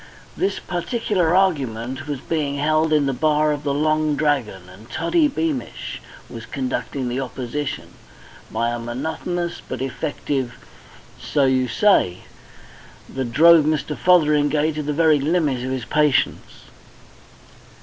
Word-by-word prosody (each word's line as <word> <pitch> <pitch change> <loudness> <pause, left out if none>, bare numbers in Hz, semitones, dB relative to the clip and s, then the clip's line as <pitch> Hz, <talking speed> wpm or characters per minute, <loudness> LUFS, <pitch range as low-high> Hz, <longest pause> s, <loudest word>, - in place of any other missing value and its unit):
This 390 +2 -1
particular 180 -2 -1
argument 135 - 0
was 145 -3 -3
being 150 -4 -2
held 155 +2 +1
in 150 -2 +3
the 135 - 0
bar 150 +3 +2
of 145 -1 -3
the 140 - 0
Long 155 +1 +1
Dragon, 135 -11 -1
and 100 +6 -15
Toddy 330 -3 +2
Beamish 295 -1 -4 0.3
was - - -9
conducting 145 - -3
the 125 +2 -2
opposition 135 +3 -4 0.6
by 115 +2 -1
a 120 - -3
monotonous 160 +8 -4
but - - -7
effective 135 -1 -3 0.6
"So 145 -2 +1
you 130 -1 +2
say," 115 - +2 0.9
that 130 -3 -3
drove 165 +3 +6
Mr. 155 -1 -1
Fotheringay 150 -3 +3
to 155 0 -4
the 150 0 -2
very 155 0 +3
limit 150 -2 +1
of 130 - -3
his 130 -2 -3
patience. 150 +1 0
150 Hz, 130 wpm, -21 LUFS, 130-160 Hz, 0.9 s, drove